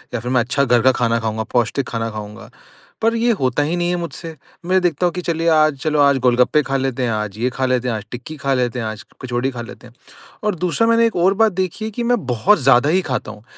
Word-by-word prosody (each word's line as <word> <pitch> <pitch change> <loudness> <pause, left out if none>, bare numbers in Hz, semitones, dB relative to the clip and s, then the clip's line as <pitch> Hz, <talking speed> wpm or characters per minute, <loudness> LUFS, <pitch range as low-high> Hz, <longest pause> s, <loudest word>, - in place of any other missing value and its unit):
या - - -1
फिर 125 +1 -4
मैं 125 - +3
अच्छा 140 +4 0
घर 120 -2 +3
का 130 - +5
खाना 115 -2 0
खाऊँगा, 110 -1 -2
पौष्टिक 120 +3 -1
खाना 115 -1 -3
खाऊँगा। 105 0 -9 0.5
पर 230 +1 +2
ये 235 +1 +2
होता 130 +2 +1
ही 155 +4 -1
नहीं 175 0 0
है 180 - 0
मुझसे, 165 -1 -7 0.3
मैं 185 +1 +2
देखता 175 -1 0
हूँ 175 - -3
कि 180 - -4
चलिए 165 -1 -2
आज 155 -2 +3
चलो 150 -1 0
आज 140 -1 +4
गोलगप्पे 125 +4 +3
खा 135 0 -1
लेते 130 -1 -2
हैं, 120 - 0
आज 105 -2 -3
ये 125 +2 +1
खा 130 +1 -2
लेते 125 -1 0
हैं, 115 - -1
आज 105 -2 -6
टिक्की 125 +6 -8
खा 140 -1 -1
लेते 125 -1 -1
हैं, 115 - -3
आज 110 +2 -7 0.2
कचौड़ी 125 +1 -1
खा 120 -2 -6
लेते 120 +1 -11
हैं। 120 - -19 0.5
और 210 -2 +1
दूसरा 180 +6 0
मैंने 230 0 +4
एक 225 - -2
और 180 +3 +3
बात 220 +1 +3
देखी 185 +3 -3
है 220 - -3
कि 240 - -4
मैं 240 - 0
बहुत 130 - +3
ज़्यादा 135 +1 +4
ही 185 +3 +2
खाता 125 - -2
हूँ। 110 0 -15
135 Hz, 265 wpm, -19 LUFS, 120-175 Hz, 0.5 s, का